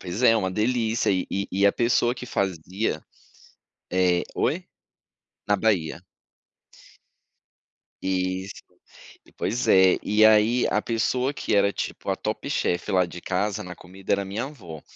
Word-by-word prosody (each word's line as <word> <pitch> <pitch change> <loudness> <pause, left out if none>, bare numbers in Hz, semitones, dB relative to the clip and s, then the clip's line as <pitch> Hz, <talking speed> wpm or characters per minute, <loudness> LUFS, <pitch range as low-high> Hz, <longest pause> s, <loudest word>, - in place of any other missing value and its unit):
pois 95 +6 -5
é 115 -2 +6
uma 95 -4 0
delícia 115 +2 0
e 95 -1 0
e 100 +1 -2
e 100 +2 +3
a 100 - +4
pessoa 120 +1 +2
que 125 - -8
fazia, 95 -3 -2 0.9
eh 90 -1 +2
oi? - - 0 0.8
Na 105 - +4
Bahia. 90 -8 0 2.0
Isso. 95 +1 -2 0.7
Pois 120 +3 -1
é. 95 -1 +6
E 105 +1 +4
aí, 110 +3 +4
a 105 - +2
pessoa 125 +4 0
que 110 - -1
era 100 0 +4
tipo - - -5
a - - +1
top - - -4
chefe 90 +4 -1
lá 90 -1 +3
de 85 0 -10
casa 100 +3 -1
na 90 -1 -8
comida 95 +1 -8
era 100 - 0
a - - -9
minha 100 +6 -3
avó. 90 - -10
100 Hz, 150 wpm, -25 LUFS, 90-110 Hz, 2.0 s, é